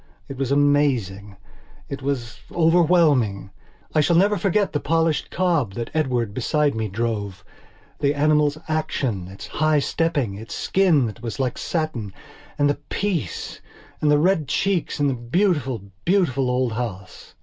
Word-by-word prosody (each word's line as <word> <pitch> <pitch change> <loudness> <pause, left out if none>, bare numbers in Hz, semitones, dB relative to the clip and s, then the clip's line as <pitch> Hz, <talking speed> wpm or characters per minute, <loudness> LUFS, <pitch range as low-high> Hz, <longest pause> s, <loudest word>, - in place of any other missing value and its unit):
It 135 - -8
was 135 -1 -1
amazing. 130 -9 +1 0.5
It 140 0 -6
was 130 -4 -3
overwhelming. 160 - +3 0.4
I - - +3
never 175 +7 +4
shall - - 0
forget 200 0 +1
the 145 - +1
polished 165 0 0
cob 165 - 0
that 115 -1 -4
Edward, 125 -9 0
beside 145 +5 +1
me, 110 -1 -2
drove; 105 -2 -3 0.5
the 140 0 +1
animal's 150 0 +2
action, 130 - -2
its 95 +1 -9
high 155 0 +1
stepping, 145 -6 0
its 110 - -7
skin 175 -9 +2
that 115 +1 -6
was 120 +3 -5
like 130 -3 0
satin. 155 - -3 0.4
And 145 - +3
the 145 0 0
peace! 190 - -3 0.4
And 150 - +2
the 150 - +5
red 165 -1 +2
cheeks! 195 -6 0
And 145 - +3
the 135 - +1
beautiful, 130 - 0 0.2
beautiful 140 -9 +2
old 125 -2 0
house. 105 -5 -6
145 Hz, 150 wpm, -23 LUFS, 115-160 Hz, 0.5 s, the